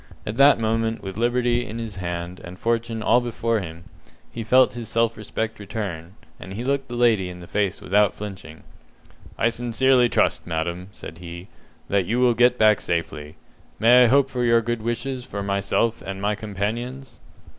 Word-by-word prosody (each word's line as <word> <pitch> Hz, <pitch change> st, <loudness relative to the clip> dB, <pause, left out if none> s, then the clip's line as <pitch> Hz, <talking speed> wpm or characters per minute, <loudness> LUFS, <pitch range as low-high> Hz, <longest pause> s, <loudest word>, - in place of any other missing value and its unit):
At 105 Hz, +2 st, -4 dB
that 140 Hz, -2 st, +6 dB
moment, 115 Hz, 0 st, -1 dB
with 95 Hz, -1 st, -6 dB
liberty 120 Hz, +1 st, +1 dB
in 115 Hz, -1 st, -7 dB
his 115 Hz, -3 st, -6 dB
hand, 85 Hz, 0 st, -5 dB
and 90 Hz, +2 st, -9 dB
fortune 115 Hz, 0 st, -1 dB
all 120 Hz, -, +4 dB
before 115 Hz, -1 st, -1 dB
him, 85 Hz, -3 st, -8 dB, 0.5 s
he 115 Hz, -, -5 dB
felt 130 Hz, +4 st, +4 dB
his 120 Hz, -2 st, -7 dB
self 115 Hz, 0 st, +1 dB
respect 110 Hz, +1 st, -4 dB
return, 95 Hz, -4 st, -6 dB, 0.2 s
and 95 Hz, -, -9 dB
he 115 Hz, +4 st, -5 dB
looked 135 Hz, +1 st, -1 dB
the 120 Hz, -, -6 dB
lady 115 Hz, -6 st, +2 dB
in 90 Hz, 0 st, -9 dB
the 90 Hz, -, -10 dB
face 100 Hz, +1 st, -1 dB
without 105 Hz, +2 st, +2 dB
flinching. 95 Hz, -6 st, -9 dB, 0.7 s
"I 115 Hz, -, +3 dB
sincerely 120 Hz, +1 st, +2 dB
trust, -, -, +1 dB
madam," 85 Hz, +2 st, -3 dB
said 80 Hz, -4 st, -10 dB
he, 85 Hz, +2 st, -9 dB, 0.4 s
"that 95 Hz, -3 st, +1 dB
you 120 Hz, +3 st, 0 dB
will 125 Hz, -1 st, +4 dB
get 125 Hz, +2 st, +4 dB
back 110 Hz, -3 st, +4 dB
safely. 80 Hz, -3 st, -3 dB, 0.4 s
May 120 Hz, +3 st, +6 dB
I -, -, +5 dB
hope 135 Hz, +3 st, +4 dB
for 125 Hz, -1 st, -1 dB
your 115 Hz, -1 st, +4 dB
good 120 Hz, 0 st, -2 dB
wishes 120 Hz, +3 st, -3 dB
for 100 Hz, -4 st, -5 dB
myself 100 Hz, +4 st, 0 dB
and 95 Hz, 0 st, -6 dB
my 105 Hz, +1 st, 0 dB
companions?" 115 Hz, +6 st, -5 dB
110 Hz, 180 wpm, -23 LUFS, 95-120 Hz, 0.7 s, that